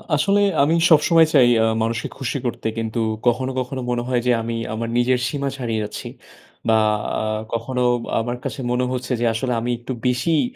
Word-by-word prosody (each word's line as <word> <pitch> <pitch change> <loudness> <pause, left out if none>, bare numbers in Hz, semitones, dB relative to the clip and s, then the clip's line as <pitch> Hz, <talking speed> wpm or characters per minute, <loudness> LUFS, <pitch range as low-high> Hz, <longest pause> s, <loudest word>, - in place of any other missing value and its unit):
আসলে 200 +7 +2 0.2
আমি 150 +3 +2 0.2
সবসময় 165 +1 +6
চাই 130 -5 +6 0.2
আ - - +3 0.2
মানুষকে 115 0 -2
খুশি 135 0 -3
করতে 120 -2 -2
কিন্তু 115 0 -2 0.3
কখনো 130 +2 +1
কখনো 130 +1 -4
মনে 120 -1 -1
হয় 125 -2 +1
যে - - +5
আমি 115 +1 -3 0.2
আমার 115 +1 -3
নিজের 125 +1 +2
সীমা 140 +2 -2
ছাড়িয়ে 115 -4 -2
যাচ্ছি। 105 - -6 0.6
বা 110 -1 +4 0.4
আ - - -2 0.3
কখনো 125 +2 -2 0.4
আমার 120 +2 -3
কাছে - - -5
মনে 125 +1 +1
হচ্ছে 130 0 -4
যে - - +2
আসলে 125 +3 -1
আমি 120 +1 -1
একটু 125 +2 -5
বেশিই 150 +6 +2
125 Hz, 180 wpm, -21 LUFS, 115-135 Hz, 0.6 s, সবসময়